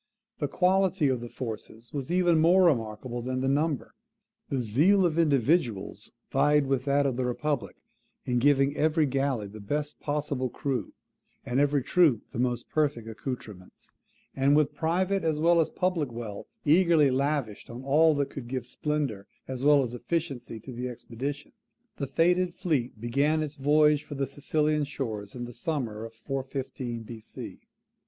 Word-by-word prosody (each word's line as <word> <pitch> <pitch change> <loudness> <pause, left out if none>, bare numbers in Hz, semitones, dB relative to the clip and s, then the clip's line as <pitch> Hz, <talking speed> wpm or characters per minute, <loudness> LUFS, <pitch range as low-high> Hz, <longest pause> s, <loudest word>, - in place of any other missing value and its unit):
The 145 - 0
quality 185 -1 +2
of 125 -2 0
the 120 - -7
forces 115 -1 -7
was 140 -3 -4
even 175 -2 +3
more 175 +4 +5
remarkable 120 -4 0
than 130 +1 -2
the 135 - 0
number. 145 +1 0 0.6
The 130 -3 -1
zeal 170 - +4
of 170 -1 +1
individuals 130 - +1 0.2
vied 145 +1 +3
with 135 -1 0
that 140 0 +2
of 130 -3 0
the 130 - 0
republic 145 +2 -2 0.5
in 125 -1 +1
giving 140 +1 +3
every 155 0 +2
galley 135 -4 0
the 105 +2 -10
best 145 +8 -3
possible 145 -3 -2
crew, 135 +1 -3 0.5
and 130 0 0
every 145 -1 +2
troop 155 -10 +3
the - - -5
most 125 -1 -1
perfect 145 -7 0
accoutrements. 110 -4 -8 0.4
And 135 +2 +3
with 150 -1 +3
private 180 +6 0
as 160 -2 +1
well 170 +2 +4
as 160 - 0
public 175 -8 -1
wealth 115 -4 -7 0.2
eagerly 160 -2 +5
lavished 135 -5 -1
on 120 +2 -8
all 155 +3 +4
that 140 -1 -1
could 130 -4 -7
give 125 -1 -3
splendour 140 -7 -3 0.2
as 130 0 -5
well 145 -1 +6
as 120 -2 -4
efficiency 130 -4 -3
to 130 - -9
the 125 +1 -4
expedition, 125 +4 -6 0.5
the 140 - -3
fated 175 +5 +2
fleet 140 - -1
began 140 +7 +1
its 150 -1 -5
voyage 150 +1 +3
for 145 - -8
the 135 0 0
Sicilian 150 +2 0
shores 110 -8 -5
in 120 -1 -4
the 120 - -9
summer 120 -5 -3
of 115 0 -11
415 130 -1 -4
B.C. 110 -1 -9
140 Hz, 160 wpm, -28 LUFS, 120-150 Hz, 0.6 s, well